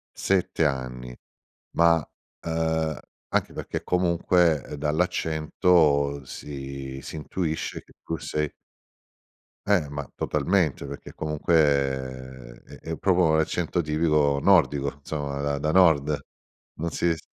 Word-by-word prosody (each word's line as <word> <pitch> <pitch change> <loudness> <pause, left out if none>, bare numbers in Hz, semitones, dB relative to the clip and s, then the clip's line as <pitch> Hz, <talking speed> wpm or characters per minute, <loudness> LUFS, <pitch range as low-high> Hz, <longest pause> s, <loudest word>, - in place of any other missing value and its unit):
7 90 -4 +1
anni, 65 -3 -3 0.6
ma, 85 0 +5
uh, 80 -1 -3 0.3
anche - - 0
perché - - -5
comunque, 85 -4 +2
dall'accento, 75 -2 +2
si 70 -1 -7
si 70 - -8
intuisce 80 +1 -3
che - - -22
tu 80 - -3
sei 75 -1 -2 1.2
Eh, 95 -7 +4
ma 70 -2 -6
totalmente, 75 -2 0
perché 70 - -8
comunque 65 -5 0
è - - -13 0.2
è 80 - -1
proprio 90 0 +2
un 80 0 +3
accento 85 +2 0
tipico 75 -2 +2
nordico 70 -7 +3
insomma, 70 -1 -4
da 70 0 -1
da 75 +1 0
nord. 75 -5 +4 0.6
Non 85 +2 -2
si 85 +3 +1
s 80 - -7
75 Hz, 115 wpm, -25 LUFS, 70-85 Hz, 1.2 s, ma